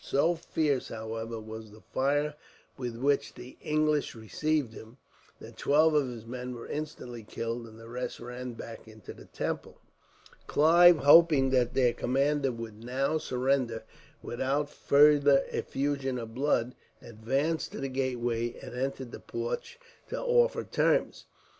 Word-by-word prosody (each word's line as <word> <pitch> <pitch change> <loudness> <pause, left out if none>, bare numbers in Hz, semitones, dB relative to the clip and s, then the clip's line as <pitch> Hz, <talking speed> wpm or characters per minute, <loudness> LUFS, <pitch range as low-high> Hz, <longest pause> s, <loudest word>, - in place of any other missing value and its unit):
So 160 +5 +2
fierce, 155 -5 -1
however, 110 +1 -5
was 110 0 -9
the 105 +1 -16
fire 145 +3 +1 0.4
with 125 -3 -5
which 140 +3 0
the 125 +1 -11
English 150 -2 +1
received 135 +3 -1
him, 110 +3 -12 0.4
that - - -12
twelve 155 +2 +4
of 145 -3 +3
his 115 -3 -8
men 125 +1 -6
were 115 - -8
instantly 145 -6 -6
killed, 115 +2 -5
and 110 0 -14
the 115 - -12
rest 125 +2 -5
ran 125 +1 -6
back 115 0 -9
into 110 -2 -11
the - - -14
temple. - - -5 0.7
Clive, 170 +3 +6
hoping 145 -2 +6
that 125 -2 +2
their 125 -3 +3
commander 135 +2 +1
would 115 -2 -8
now 135 +6 0
surrender 125 -4 0 0.4
without 140 +4 -1
further 145 -1 +5
effusion 135 -2 -2
of 115 -2 -7
blood, 125 -2 +1 0.3
advanced 135 +9 -2
to - - -6
the 135 - -2
gateway 120 -3 -2
and - - -10
entered 130 0 -3
the - - -8
porch 470 +5 -5 0.3
to - - -3
offer 485 0 +2
terms. - - +1
130 Hz, 145 wpm, -29 LUFS, 115-145 Hz, 0.7 s, Clive